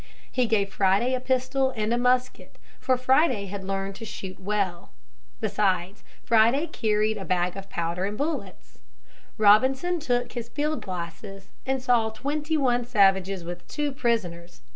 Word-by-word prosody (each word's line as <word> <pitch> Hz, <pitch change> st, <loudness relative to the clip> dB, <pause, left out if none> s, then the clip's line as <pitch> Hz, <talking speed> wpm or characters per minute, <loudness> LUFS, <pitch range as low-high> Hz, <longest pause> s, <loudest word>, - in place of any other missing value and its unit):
He 250 Hz, -2 st, +1 dB
gave 200 Hz, -3 st, +1 dB
Friday 195 Hz, +7 st, +2 dB
a 255 Hz, -, +1 dB
pistol 260 Hz, +1 st, +1 dB
and 215 Hz, +1 st, 0 dB
a -, -, +2 dB
musket, 250 Hz, +1 st, 0 dB, 0.2 s
for 255 Hz, -1 st, +1 dB
Friday 255 Hz, -4 st, +2 dB
had 200 Hz, 0 st, -6 dB
learned 195 Hz, 0 st, -3 dB
to 230 Hz, -, -9 dB
shoot 190 Hz, -3 st, -7 dB
well. 195 Hz, -3 st, -2 dB, 0.5 s
Besides 195 Hz, -2 st, 0 dB, 0.2 s
Friday 235 Hz, +7 st, +4 dB
carried 215 Hz, -7 st, 0 dB
a -, -, -5 dB
bag 180 Hz, -1 st, 0 dB
of 195 Hz, 0 st, -8 dB
powder 170 Hz, +2 st, -2 dB
and 205 Hz, +1 st, -4 dB
bullets. 310 Hz, +3 st, -5 dB, 0.6 s
Robinson 260 Hz, +11 st, +4 dB
took 245 Hz, -5 st, -1 dB
his 235 Hz, -1 st, -6 dB
field 300 Hz, +4 st, -2 dB
glasses 185 Hz, +2 st, -7 dB, 0.2 s
and 265 Hz, -1 st, -1 dB
saw 240 Hz, -3 st, +3 dB
twenty 295 Hz, +7 st, -2 dB
one 245 Hz, -4 st, +2 dB
savages 195 Hz, -5 st, +2 dB
with 175 Hz, +1 st, -8 dB
two 295 Hz, -1 st, -2 dB
prisoners. 180 Hz, -, -2 dB
220 Hz, 150 wpm, -26 LUFS, 195-255 Hz, 0.6 s, Friday